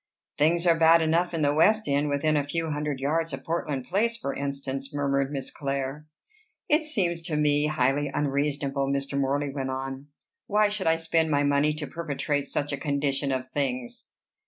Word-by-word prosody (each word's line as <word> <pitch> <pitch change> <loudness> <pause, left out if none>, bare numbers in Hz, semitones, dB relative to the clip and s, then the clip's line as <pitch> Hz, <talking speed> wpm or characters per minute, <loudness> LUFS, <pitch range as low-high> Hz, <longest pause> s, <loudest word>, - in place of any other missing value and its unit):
"Things 170 +4 +2
are 170 - +6
bad 165 0 +6
enough 165 +3 +2
in 165 -3 -1
the 145 0 +3
West 215 +8 +3
End, 145 +1 +1
within 145 +2 +1
a 145 - +2
few 165 +1 -2
hundred 150 -2 -2
yards 160 +3 0
of 135 0 -5
Portland 150 -5 -2
Place, 230 +5 0
for 140 -10 -3
instance," 140 -1 -4
murmured 140 -1 0
Miss 135 -2 -4
Clare. 140 +1 -4 0.6
"It 300 +2 +4
seems 185 - -1
to 165 -2 -3
me 150 0 +2
highly 145 0 +1
unreasonable," 140 -1 -1
Mr. 140 0 -2
Morley 140 +1 0
went 135 -2 -3
on. 135 +1 -5 0.4
"Why 210 0 +3
should 205 -4 -2
I 160 - +5
spend 165 0 +1
my 145 -1 +2
money 145 +1 +3
to 150 -1 -4
perpetuate 145 -3 -2
such 145 0 -2
a 140 - -2
condition 140 -1 -1
of 130 0 -3
things?" 130 -3 -3
145 Hz, 180 wpm, -26 LUFS, 140-160 Hz, 0.6 s, are